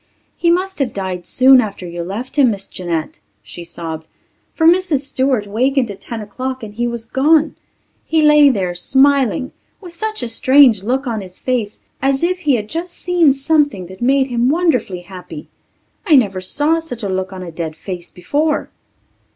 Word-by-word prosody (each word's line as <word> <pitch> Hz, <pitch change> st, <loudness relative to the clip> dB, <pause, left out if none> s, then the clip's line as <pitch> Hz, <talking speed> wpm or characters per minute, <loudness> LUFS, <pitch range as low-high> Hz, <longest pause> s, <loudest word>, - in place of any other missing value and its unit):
"He 340 Hz, -, +1 dB
must 375 Hz, +2 st, 0 dB
have 260 Hz, -5 st, -2 dB
died 185 Hz, -2 st, -4 dB
soon 260 Hz, 0 st, +6 dB
after 200 Hz, -5 st, -6 dB
you 170 Hz, 0 st, -6 dB
left 205 Hz, +9 st, -6 dB
him, 275 Hz, -4 st, +4 dB
Miss 200 Hz, -3 st, -4 dB
Jeanette," 165 Hz, -, -4 dB, 0.2 s
she 145 Hz, +11 st, -9 dB
sobbed, 160 Hz, -2 st, -7 dB, 0.4 s
"for 320 Hz, -, -1 dB
Mrs. 340 Hz, -4 st, +3 dB
Stewart 260 Hz, -5 st, 0 dB
wakened 245 Hz, +3 st, 0 dB
at 195 Hz, -, -11 dB
ten 230 Hz, -2 st, -6 dB
o'clock 255 Hz, +4 st, -5 dB
and 210 Hz, -1 st, -8 dB
he 240 Hz, +3 st, -2 dB
was 235 Hz, -1 st, -3 dB
gone. 300 Hz, +6 st, +2 dB, 0.5 s
He 320 Hz, -1 st, +1 dB
lay 300 Hz, -1 st, +6 dB
there, 190 Hz, -8 st, -1 dB
smiling, 265 Hz, +5 st, +2 dB, 0.3 s
with 355 Hz, -4 st, -11 dB
such 435 Hz, +4 st, -4 dB
a -, -, -2 dB
strange 255 Hz, -2 st, +5 dB
look 260 Hz, +7 st, -1 dB
on 225 Hz, -4 st, -3 dB
his 185 Hz, -1 st, -7 dB
face 235 Hz, -5 st, -2 dB, 0.2 s
as 270 Hz, +2 st, +1 dB
if 360 Hz, +1 st, 0 dB
he 295 Hz, -6 st, +2 dB
had 210 Hz, -3 st, -3 dB
just 340 Hz, +6 st, -5 dB
seen 345 Hz, -5 st, +2 dB
something 280 Hz, -, +1 dB
that 185 Hz, +3 st, -13 dB
made 265 Hz, +2 st, +3 dB
him 245 Hz, -1 st, 0 dB
wonderfully 280 Hz, -, 0 dB
happy. 180 Hz, 0 st, -10 dB, 0.5 s
I 330 Hz, -8 st, +4 dB
never 200 Hz, -8 st, +2 dB
saw 295 Hz, -, +1 dB
such 245 Hz, -9 st, -6 dB
a -, -, -1 dB
look 190 Hz, 0 st, -3 dB
on 185 Hz, -1 st, -7 dB
a 170 Hz, -, -8 dB
dead 160 Hz, -1 st, -5 dB
face 175 Hz, 0 st, -7 dB
before." 295 Hz, -, -2 dB
250 Hz, 185 wpm, -17 LUFS, 190-290 Hz, 0.5 s, soon